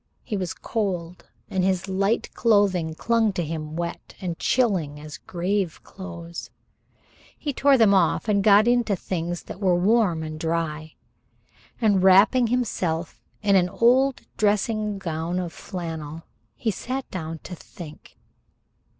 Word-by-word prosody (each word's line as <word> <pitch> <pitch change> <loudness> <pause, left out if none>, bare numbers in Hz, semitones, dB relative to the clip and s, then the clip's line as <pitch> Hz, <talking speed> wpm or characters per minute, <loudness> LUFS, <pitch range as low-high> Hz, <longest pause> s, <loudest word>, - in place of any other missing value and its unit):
He 220 - -3
was 185 -3 -3
cold, 180 -6 -3 0.2
and 190 -1 -1
his 190 0 +1
light 195 +4 0
clothing 195 -8 +2
clung 230 +2 +2
to 175 -3 -2
him 155 0 -5
wet 170 0 -5
and 175 -3 -4
chilling 185 - +1
as 150 0 -9
grave 185 0 -2
clothes. 170 -3 -8 0.9
He 290 -2 -3
tore 275 +1 +4
them 220 -4 +5
off 185 +2 +2
and 200 -2 +2
got 205 +1 +6
himself 245 +1 +4
into 200 - +3
things 175 -1 -4
that - - -9
were 185 -3 +3
warm 185 -3 +2
and 155 0 -6
dry, 160 -1 -2 0.8
and 205 -5 +3
wrapping 200 +6 +6
himself 180 -9 -1 0.2
in 200 -1 +4
an 180 -1 +4
old 255 +6 +3 0.2
dressing 210 0 +1
gown 170 -1 -3
of 175 -2 -3
flannel, 165 -4 -6 0.5
sat 255 +6 -4
down 165 -3 -5
to - - -8
think. 165 -2 -11
185 Hz, 140 wpm, -24 LUFS, 165-210 Hz, 0.9 s, got